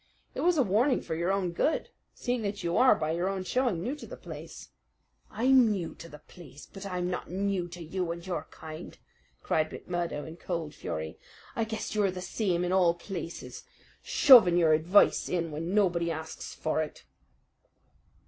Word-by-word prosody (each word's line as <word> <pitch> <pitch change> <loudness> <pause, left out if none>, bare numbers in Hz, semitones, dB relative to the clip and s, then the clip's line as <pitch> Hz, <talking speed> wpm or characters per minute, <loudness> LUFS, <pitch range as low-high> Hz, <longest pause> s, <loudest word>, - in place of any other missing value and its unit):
"It - - -4
was 350 -1 +3
a 275 - +5
warning 240 +6 +2
for - - -5
your 170 +3 0
own 195 -3 0
good, 295 - 0 0.3
seeing 245 -2 -2
that 205 -1 -3
you 170 0 -1
are, 255 - +6
by 155 0 -2
your 175 +3 0
own 195 -1 -3
showing, 230 -5 0
new 255 +5 -2
to - - -10
the - - -9
place." - - -10 0.6
"I'm 250 +1 +4
new 185 -6 -2
to 170 - -11
the 150 - -10
place; 150 -2 -14
but 195 0 -9
I'm 180 -2 -2
not 180 - -4
new 190 -1 -1
to 175 0 -9
you 175 +1 -3
and 170 +1 -7
your 170 -4 -4
kind!" 155 0 -9 0.5
cried 155 -1 +1
McMurdo 170 -4 -4
in 160 +1 -9
cold 165 -4 -4
fury. 80 0 -5 0.4
"I 225 - 0
guess 220 0 -4
you're 210 -2 +2
the 185 0 -5
same 180 -1 -1
in 175 - -1
all 175 -3 +4
places, 175 -2 -7 0.4
shoving 220 -11 +7
your 165 -3 +5
advice 170 +6 +4
in 170 -2 -1
when 165 +6 -3
nobody 175 -5 +2
asks 160 -1 -6
for 155 0 -1
it." 155 - -6
180 Hz, 185 wpm, -29 LUFS, 165-200 Hz, 0.6 s, shoving